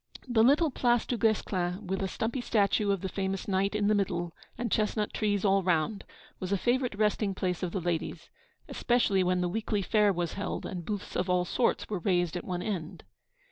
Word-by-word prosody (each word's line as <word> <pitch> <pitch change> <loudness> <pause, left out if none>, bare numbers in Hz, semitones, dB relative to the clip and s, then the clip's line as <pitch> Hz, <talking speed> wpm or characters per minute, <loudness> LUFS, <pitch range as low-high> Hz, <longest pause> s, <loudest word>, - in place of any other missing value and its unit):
The 235 -3 +4
little 290 +5 +4
Place 240 -2 +2
Du 245 - -1
Guesclin, 200 -4 0
with 190 +1 -2
a 195 - 0
stumpy 230 +6 -2
statue 205 -2 +2
of 195 -3 +1
the 190 - -2
famous 190 0 -3
knight 195 +1 +1
in 210 -1 +1
the 210 - +4
middle 175 -4 -1 0.2
and 235 -3 -3
chestnut 210 0 0
trees 205 -2 0
all 195 0 +4
around, 180 +2 0 0.3
was 185 0 -4
a 200 - +3
favourite 245 +1 0
resting 210 -2 +1
place 180 -2 -2
of 180 -2 -2
the 190 - -2
ladies 170 -2 -3 0.4
especially 225 -6 +2
when 180 0 +1
the 180 - +1
weekly 210 +1 -1
fair 210 +1 +3
was 175 -3 -2
held 200 - -4
and 175 -3 -5
booths 205 -2 -5
of 180 +1 0
all 180 0 +2
sorts 240 +7 0
were 205 -3 -3
raised 175 -1 +1
at 175 - -3
one 180 -1 -3
end. 185 -4 -4
195 Hz, 205 wpm, -29 LUFS, 180-215 Hz, 0.4 s, The